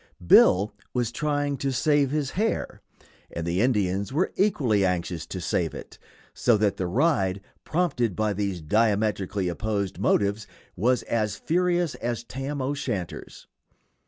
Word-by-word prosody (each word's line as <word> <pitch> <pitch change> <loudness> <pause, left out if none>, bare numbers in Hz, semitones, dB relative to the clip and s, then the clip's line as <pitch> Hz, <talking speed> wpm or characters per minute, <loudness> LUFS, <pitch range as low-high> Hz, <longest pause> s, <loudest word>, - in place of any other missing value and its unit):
Bill 100 +4 +6 0.2
was 120 -2 0
trying 145 +1 -1
to 135 +1 -1
save 145 +1 +2
his 145 -1 -1
hair, 220 +4 -2 0.5
and 85 - -4
the 85 +3 0
Indians 100 -5 +1
were 160 +7 0
equally 130 - +2
anxious 90 -3 -1
to 95 - -5
save 85 -1 -1
it, - - -10 0.3
so 120 -3 +3
that 105 -1 +1
the 90 - -2
ride, 100 - +1 0.3
prompted 130 - 0
by 110 -1 0
these 100 -3 -2
diametrically 105 +1 +1
opposed 100 +1 -2
motives, 100 +1 +1 0.3
was 125 +6 +1
as 110 -3 -1
furious 175 -1 0
as 120 0 -3
Tam 135 +3 -4
O'Shanter's. 130 - -4
110 Hz, 135 wpm, -25 LUFS, 95-140 Hz, 0.5 s, Bill